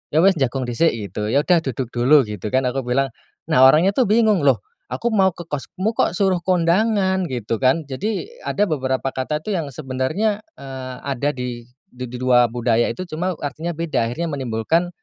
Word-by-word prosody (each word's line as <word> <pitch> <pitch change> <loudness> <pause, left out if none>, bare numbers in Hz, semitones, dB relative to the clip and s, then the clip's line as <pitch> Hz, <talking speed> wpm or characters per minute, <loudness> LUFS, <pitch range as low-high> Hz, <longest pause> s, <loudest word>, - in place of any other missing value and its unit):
"Ya, 160 - +5
wis, 195 - +7
jagong 135 0 0
dhisik." 125 +7 +1
Gitu, 105 -1 -4
"Ya, 145 +2 +3
udah, 175 -1 +4
duduk 130 -4 -4
dulu." 130 +4 +5
Gitu, 105 -2 -6
kan, 130 - +3
aku 130 +1 -2
bilang. 135 +2 +1 0.4
Nah, 130 +1 +7
orangnya, 160 +8 +5
tuh, 255 -1 +2
bingung, 215 -4 +4
"Loh, 130 -4 +5 0.3
aku 235 - -1
mau 190 -3 +4
ke 175 - -9
kosmu, 180 +8 -3
kok, 175 - +1
suruh 190 -3 +2
kondangan." 190 +1 +1
Gitu, 115 -3 -2
kan. 135 +5 +2
Jadi 195 - -3
ada 205 - 0
beberapa 135 -3 -1
kata, 150 +4 -2
tuh, 210 - -2
yang 160 -6 -2
sebenarnya, 155 - -2 0.2
eee, 130 -1 -7
ada 140 +1 -1
di 125 -2 -6 0.2
di 125 0 -6
2 125 -1 +4
budaya 120 0 +1
itu, 185 - -5
cuma 180 +4 -2
artinya 155 +4 -3
beda. 155 -8 0
Akhirnya 165 +8 -3
menimbulkan, 135 +6 0
140 Hz, 185 wpm, -21 LUFS, 125-180 Hz, 0.4 s, wis